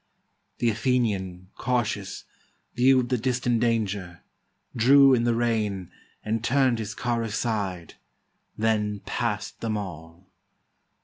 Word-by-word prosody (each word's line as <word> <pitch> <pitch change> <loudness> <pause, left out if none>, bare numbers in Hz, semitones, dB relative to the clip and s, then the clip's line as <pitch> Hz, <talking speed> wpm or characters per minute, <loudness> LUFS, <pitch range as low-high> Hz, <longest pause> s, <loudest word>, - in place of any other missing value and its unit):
The 120 - +2
Athenian, 100 -7 -1
cautious, 115 -5 -2 0.5
viewed 130 0 +3
the 125 -2 +1
distant 125 -1 0
danger, 105 -6 -1 0.5
Drew 135 +3 +6
in 120 -2 +2
the 120 -1 +2
rein, 110 -6 -1 0.3
and 110 +1 -1
turn'd 130 -2 +2
his 110 0 -5
car 120 -1 -1
aside; 105 -6 -3 0.6
Then 105 -2 0
pass'd 105 -4 -3
them 110 -2 -1
all. 85 -2 -8
115 Hz, 110 wpm, -26 LUFS, 100-120 Hz, 0.6 s, Drew